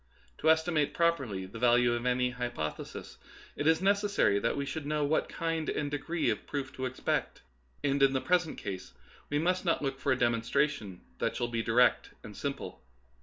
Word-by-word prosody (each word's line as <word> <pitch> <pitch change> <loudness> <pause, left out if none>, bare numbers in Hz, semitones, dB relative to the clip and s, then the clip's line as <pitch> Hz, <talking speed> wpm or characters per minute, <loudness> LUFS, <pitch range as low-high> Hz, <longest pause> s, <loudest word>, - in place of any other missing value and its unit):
To - - +3
estimate 160 -2 +2
properly 135 - +1
the 100 +5 -9
value 120 0 +4
of 120 +1 -2
any 125 0 +2
hypothesis, 120 -11 -5 0.4
it 145 - -1
is 160 +1 +4
neces 200 +1 +3
sary 100 - +3
that - - 0
we 140 - -1
should 145 +1 -5
know 150 0 0
what 155 +2 +1
kind 165 -1 -2
and 145 -1 -2
degree 155 -1 0
of 105 - -5
proof 140 -2 -4
to 130 0 -1
expect; 130 - -2 0.4
and 140 0 +1
in 135 0 +5
the 130 - +2
present 175 +1 +1
case 95 - -6 0.4
we 145 - 0
must 180 +4 +1
not 170 -4 +1
look 135 -1 -2
for 140 - 0
a 130 - +3
demonstration 120 -3 0 0.2
that - - -1
shall 120 - -1
be 115 -1 -1
di 115 - -2
rect 125 +1 +4
and - - -10
simple. - - -5
140 Hz, 195 wpm, -30 LUFS, 120-160 Hz, 0.4 s, in